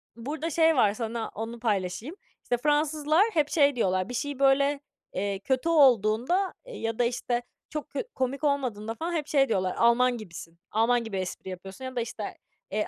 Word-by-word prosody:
burada 295 +7 -4
şey 325 0 +4
var, 210 -6 +4
sana 225 0 -3
onu 225 +2 -5
paylaşayım. 215 - -2 0.3
İşte, 245 - 0
Fransızlar 300 - +2
hep 305 -3 +2
şey 285 -3 +4
diyorlar. 185 -3 0
Bir - - -5
şey 280 +2 -3
böyle, 280 +1 +4 0.3
eee, 195 0 -2
kötü 260 +8 0
olduğunda 265 - +4
ya 225 - -4
da, 245 - +4
işte, 240 0 -1 0.3
çok 300 -1 -5
kö - - -3
komik 265 +3 -2
olmadığında 245 -7 0
falan 335 +7 -3
hep 310 -3 -2
şey 275 -3 +3
diyorlar, 185 -3 0
"Alman 240 +1 +4
gibisin. 170 -5 -10
Alman 230 +2 +2
gibi 220 -4 -4
espri 185 0 -5
yapıyorsun." 190 +6 -8
ya 260 0 -6
da, 240 - 0
işte, 230 -2 -5 0.5
eee, 210 +1 -1
245 Hz, 175 wpm, -27 LUFS, 215-290 Hz, 0.5 s, şey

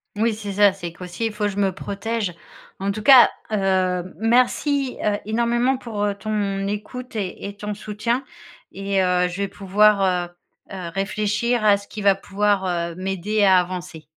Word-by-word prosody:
Oui, 220 +1 +1
c'est 210 -2 -6
ça, 200 -1 +5
c'est 175 -4 -7
qu'aussi, 180 +6 -5
il 225 - -2
faut 210 -1 -1
je 200 - -5
me 195 -2 +2
protège. 200 0 -3 0.4
En 195 +1 -1
tout 215 +2 -5
cas, 250 +2 +8 0.2
heu, 185 -3 0
merci, 255 +4 +2
heu, 210 -1 +1
énormément 235 +4 +1
pour, 225 -5 -4
heu, 205 - 0
ton 200 -2 -2
écoute 230 +5 -6
et 200 -1 -4
et 200 - -9
ton 210 0 -4
soutien 215 +5 -2 0.5
et 195 0 -1
heu, 180 -1 +2
je 180 +1 -6
vais 200 - 0
pouvoir, 195 -2 +2 0.4
heu, - - -6
heu, 180 -3 -5
réfléchir 210 +4 0
à 205 -1 +6
ce 200 0 -13
qui 210 - -7
va 200 -1 +6
pouvoir, 200 0 0 0.3
heu, - - -11
m'aider 195 +3 -1
à 190 -2 +6
avancer. 180 -3 -3
205 Hz, 180 wpm, -22 LUFS, 190-215 Hz, 0.5 s, cas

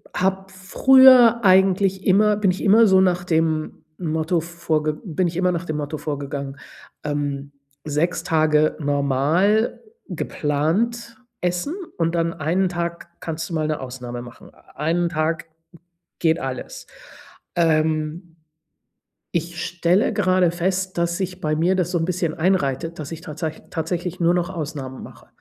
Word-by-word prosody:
habe 190 +1 -1
früher 240 +4 +6
eigentlich 190 0 +3
immer 210 +2 +4
bin 200 -3 +2
ich 185 - -5
immer 220 +3 +6
so 190 -1 +5
nach 180 -1 +2
dem 160 -2 -1
Motto 160 0 -1
vorge 160 -2 -2
bin 180 0 0
ich 170 +1 -5
immer 180 0 +2
nach 170 +1 -3
dem 155 -2 -3
Motto 150 +1 -4
vorgegangen, 140 -2 -5 0.5
ähm, 145 -1 -3 0.3
6 155 +4 -1
Tage 155 -1 +2
normal, 145 - +1 0.3
geplant 200 +12 -1 0.2
essen 180 - -2 0.2
und 165 0 0
dann 165 -1 0
1 175 +4 0
Tag 170 -1 -4
kannst 165 0 -5
du - - -7
mal 155 -1 0
'ne 155 - -2
Ausnahme 125 -2 -7
machen. 120 +1 -13 0.2
1 170 +3 0
Tag 165 +1 -1 0.7
geht 165 0 +2
alles. 130 -3 -6 0.7
Ähm. 160 +1 0 1.0
Ich 170 +1 -5
stelle 175 +3 +1
gerade 185 -3 +3
fest, 185 +2 -2
dass 170 0 0
sich 185 -1 -4
bei 155 0 0
mir 175 +4 +2
das 180 -2 -1
so 180 - +1
'n 165 - 0
bisschen 175 -2 -1
einreitet, 165 -2 0
dass 150 0 -6
ich 165 - -6
tatsä 160 -1 -4 0.2
tatsächlich 175 +2 -3
nur 170 +1 +4
noch 175 0 0
Ausnahmen 145 -7 -6
mache, - - -14
170 Hz, 145 wpm, -22 LUFS, 155-185 Hz, 1.0 s, früher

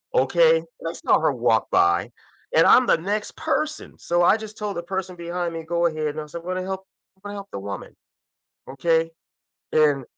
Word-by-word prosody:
okay, - - +4 0.2
that's - - -6
not - - +4
her - - +3
walk - - +1
by 390 +1 +2 0.4
and - - +6
I'm 250 -1 +6
the - - +4
next 205 +5 -3
person 310 -1 -2
so 175 0 +1
I 185 - +6
just 215 -1 -8
told 210 -2 -4
the 170 - -3
person 185 +1 -4
behind 170 0 -3
me 165 - -4
go 170 +1 0
ahead 155 -2 -1
no, 155 -1 -5
so 160 +3 -8
I'm 170 - -16
gonna 185 0 -2
help 190 0 -5 0.3
I'm 190 - -34
gonna 205 +1 -7
help 200 0 -8
the - - -5
woman. 100 0 -7 0.7
Okay, 165 +5 +1 0.6
and 145 -3 +3
175 Hz, 195 wpm, -23 LUFS, 165-205 Hz, 0.7 s, and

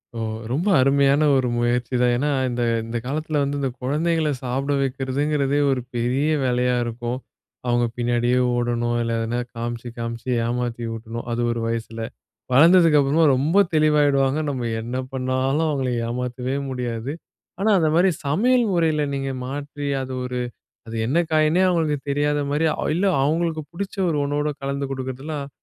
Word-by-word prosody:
ஓ - - -4 0.3
ரொம்ப 160 +10 0
அருமையான 140 +2 +4
ஒரு 130 -1 +1
முயற்சிதான். 120 +1 +1
ஏன்னா, 145 +4 0 0.2
இந்த 120 0 -2 0.2
இந்த 115 +1 -4
காலத்தில 150 +3 -1
வந்து, 140 +1 -1
இந்த 135 - 0
குழந்தைகள 155 +4 +1
சாப்புட 135 +3 -1
வைக்கிறதுங்கிறதே, 140 +2 0
ஒரு 130 -1 0
பெரிய 125 +5 +1 0.2
வேலையா 125 0 +1
இருக்கும். 120 +1 -3 0.5
அவங்க 120 0 +2
பின்னாடியே 120 +1 +1 0.2
ஓடணும். 120 0 0
இல்லை 115 0 -1
எதனா 115 +2 -1 0.2
காமிச்சி, 120 +1 -4
காமிச்சி 115 +1 -5 0.2
ஏமாத்தி 120 0 -2
ஊட்டணும். 115 +1 -6
அது 120 +1 -1
ஒரு 115 0 -2
வயசுல. 115 0 -4 0.5
வளர்ந்ததுக்கு 165 +1 +6
அப்புறமா 145 +4 +3
ரொம்ப 160 +10 +3
தெளிவாயிடுவாங்க. 145 -2 +3
நம்ம 125 -4 -2
என்ன 120 +3 -4 0.2
பண்ணாலும் 130 +4 0
அவுங்கள 135 -4 -1 0.2
ஏமாத்தவே 125 +2 -3
முடியாது. 125 -1 -3 0.5
ஆனா 215 - +2
அந்த 160 - +2
மாரி 180 +3 +5 0.2
சமையல் 240 - +3
முறையில 160 -4 +2
நீங்க 135 0 -2 0.2
மாற்றி, 145 +2 -5 0.2
அது 130 0 -5
ஒரு, 125 0 -3 0.5
அது 115 - -8
என்ன 140 +8 +1
காய்ன்னே 155 +3 +3
அவுங்களுக்கு 160 -5 +1
தெரியாத 145 +1 +1
மாரி, 150 +3 +1 0.3
இல்ல 185 +4 +1 0.2
அவுங்களுக்கு 160 +2 0
பிடிச்ச 195 +4 -5
ஒரு 155 -3 0
ஒன்னோட 145 +1 0
கலந்து 140 0 -2
குடுக்குறதுலாம், 135 +2 -5
135 Hz, 145 wpm, -23 LUFS, 120-150 Hz, 0.5 s, வளர்ந்ததுக்கு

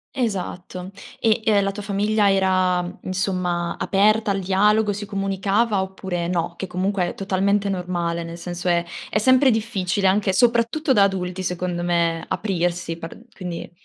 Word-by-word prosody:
Esatto, 185 -6 -3 0.3
e 225 0 +2
e 210 -2 +4
la 195 - 0
tua 205 +1 -7
famiglia 205 0 +2
era, 185 -2 +1
insomma, 185 -2 -1
aperta 210 +2 +3
al 195 - 0
dialogo, 205 +3 +3
si 205 +1 -5
comunicava 195 +1 0
oppure 190 -2 -4
no, 170 -1 -1
che 190 - -4
comunque 185 0 -1
è - - -6
totalmente 200 +1 0
normale, 175 -2 -2
nel 165 +1 -8
senso 175 +1 -3
è 170 -1 +2 0.2
è - - 0
sempre 260 +4 +5
difficile 205 -4 0
anche, 190 0 +2
soprattutto, 240 - +2
da 200 - +5
adulti, 185 -1 -1
secondo 180 -1 -2
me 170 -1 0
aprirsi 175 -4 -2
par 165 -1 -8 0.2
quindi 180 -3 -6
190 Hz, 150 wpm, -22 LUFS, 180-205 Hz, 0.3 s, sempre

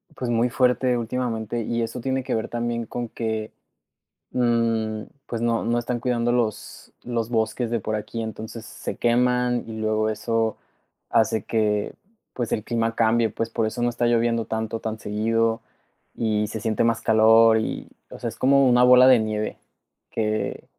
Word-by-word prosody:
pues, 125 - -4
muy 120 +2 +2
fuerte 125 0 +2
últimamente, 115 -1 -2
y 120 +1 -1
eso 115 +2 -3
tiene 130 +1 -1
que - - -2
ver 110 - -2
también 120 0 -2
con 120 +1 -5
que, 110 -1 -3 0.8
mm, 115 -3 +1 0.2
pues, 115 -1 -4
no 115 -1 +1
no 120 +1 +1
están 120 0 -2
cuidando 120 -1 0
los 115 -3 -3
los 115 -2 -2
bosques 115 +1 -1
de 115 - 0
por 110 - -3
aquí, 115 +2 -5
entonces 110 +1 -7
se - - -6
queman 125 0 +1
y 110 - -6
luego 110 0 +1
eso 110 0 -1 0.5
hace 110 -1 +2
que, 105 -2 0 0.4
pues 120 -3 -3
el 105 - -1
clima 115 -1 -1
cambie, 115 0 +3
pues, 115 +1 -3
por 115 -2 0
eso 110 +2 -3
no 120 - +2
está 120 0 -1
lloviendo 115 -1 +2
tanto, 110 0 -3
tan 110 0 -4
seguido, 115 +2 0 0.6
y 105 -2 0
se 110 - -5
siente 110 -2 0
más 115 -1 +1
calor 110 0 +5
y, 110 - -3 0.2
o - - -9
sea, 120 - -3
es 115 - -7
como 135 0 +4
una 125 0 +5
bola 125 0 +8
de 130 -2 +7
nieve 110 -1 -2 0.5
que 110 -1 -2
115 Hz, 175 wpm, -24 LUFS, 110-120 Hz, 0.8 s, bola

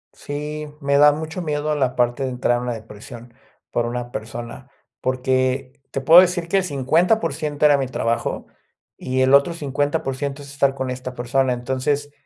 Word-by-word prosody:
Sí, 150 +1 -5
me 140 -1 +1
da 150 0 +8
mucho 160 +4 -5
miedo 150 -2 -1
la 130 -3 0
parte 120 +2 +1
de 130 - -1
entrar 125 -1 0
en 120 - -4
una 125 -1 -2
depresión 115 +2 -11 0.4
por 120 0 0
una 120 0 -4
persona, 120 +4 -7 0.3
porque 130 +1 -1
te 135 - -3
puedo 165 +6 +9
decir 180 -2 0
que 195 - +1
el 190 - +2
50% 155 - +1
era 145 -1 +5
mi 135 - -1
trabajo 115 -2 -2 0.5
y 130 0 -2
el 130 +1 +3
otro 140 +5 +5
50% 145 -1 -2
es 140 - -11
estar 140 -1 +1
con 130 -1 -3
esta 130 0 -6
persona. 130 +2 0
Entonces, 130 +4 -2
135 Hz, 170 wpm, -21 LUFS, 125-150 Hz, 0.5 s, puedo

